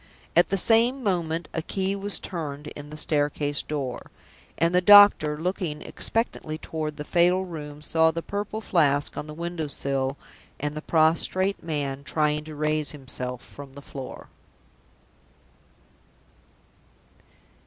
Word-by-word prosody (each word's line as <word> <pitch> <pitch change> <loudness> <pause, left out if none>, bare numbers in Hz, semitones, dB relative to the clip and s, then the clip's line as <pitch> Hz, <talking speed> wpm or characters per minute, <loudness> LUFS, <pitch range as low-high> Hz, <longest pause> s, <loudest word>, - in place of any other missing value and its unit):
At 175 - +5
the 195 - +1
same 235 +6 +4
moment 170 -5 -1
a 165 - -1
key 190 +4 -2
was 200 0 -1
turned 150 -5 -5
in 145 0 -9
the 155 - -8
staircase 145 -1 0
door. 140 -5 -5 0.5
And 165 +3 +2
the 180 - +4
doctor, 200 -6 +7
looking 170 -3 -3
expectantly 225 -9 -2
toward 155 -1 -5
the 150 - -4
fatal 180 +3 +3
room, 150 -4 -8
saw 160 +1 +3
the 165 +1 -3
Purple 205 +2 -4
Flask 145 -8 +2
on 150 - -5
the 150 - -8
window 170 -1 -4
sill, 135 -1 -2 0.4
and 150 +1 -3
the 155 - -4
prostrate 170 +5 +2
man 140 -4 -3
trying 150 0 0
to 155 -1 -8
raise 155 0 0
himself 125 -3 -5
from 140 -1 -12
the 140 - -10
floor. 135 -3 -9
155 Hz, 135 wpm, -25 LUFS, 145-180 Hz, 0.5 s, doctor